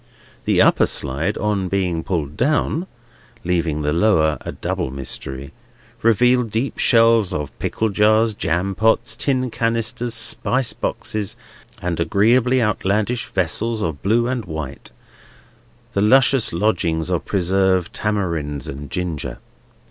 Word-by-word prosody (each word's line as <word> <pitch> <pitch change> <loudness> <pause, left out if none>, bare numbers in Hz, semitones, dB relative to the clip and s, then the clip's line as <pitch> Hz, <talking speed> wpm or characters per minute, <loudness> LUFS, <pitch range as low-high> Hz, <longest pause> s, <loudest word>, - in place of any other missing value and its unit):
The - - +4
upper - - +4
slide, 75 +9 -1
on 105 -3 -1
being 90 -4 -1
pulled 75 -6 -3
down 155 - 0 0.6
(leaving 85 -4 -1
the 75 +1 0
lower 80 -5 +2
a - - -5
double - - -3
mystery), 65 0 -6 0.5
revealed 120 +1 +3
deep 115 +6 -2
shelves 115 -4 +4
of 75 -2 -3
pickle 110 - -1
jars, 110 +2 +3
jam 90 0 -1
pots, 115 +2 +1
tin 130 -1 0
canisters, 115 +1 -1
spice 125 +2 +1
boxes, 105 -2 -3 0.5
and 90 -2 -2
agreeably 115 +9 +3
outlandish 105 +3 0
vessels 105 +5 -1
of 80 -4 -3
blue 115 +4 +2
and 125 -4 -2
white, 80 -5 -6 1.0
the 100 - +1
luscious 130 +3 +4
lodgings 85 -3 0
of 85 - 0
preserved 95 -1 +1
tamarinds 85 -9 -2
and 70 +1 -7
ginger. 85 -4 -4
100 Hz, 125 wpm, -20 LUFS, 80-115 Hz, 1.0 s, The